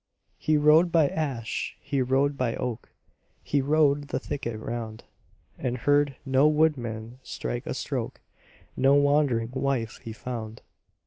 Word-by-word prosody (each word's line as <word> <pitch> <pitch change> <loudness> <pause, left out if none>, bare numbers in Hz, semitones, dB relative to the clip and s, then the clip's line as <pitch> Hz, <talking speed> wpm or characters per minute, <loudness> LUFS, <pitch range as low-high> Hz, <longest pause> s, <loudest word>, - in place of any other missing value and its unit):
He 155 -1 +2
rode 155 +4 +5
by 160 -4 +4
ash, 130 -8 -3
he 140 -2 -1
rode 135 +3 +2
by 125 -4 -1
oak, 125 -2 -4 0.5
He 145 - +1
rode 145 0 +2
the - - -2
thicket 120 -5 -4
round, 110 -1 -5 0.6
And 125 -1 -2
heard 145 +2 +2
no 135 +2 +4
woodman 125 -7 0
strike - - -5
a - - -2
stroke, - - -4 0.6
No 135 +1 +4
wandering 145 -5 +2
wife 130 -4 -1
he 115 - -6
found. 110 -1 -6
135 Hz, 135 wpm, -27 LUFS, 115-145 Hz, 0.6 s, rode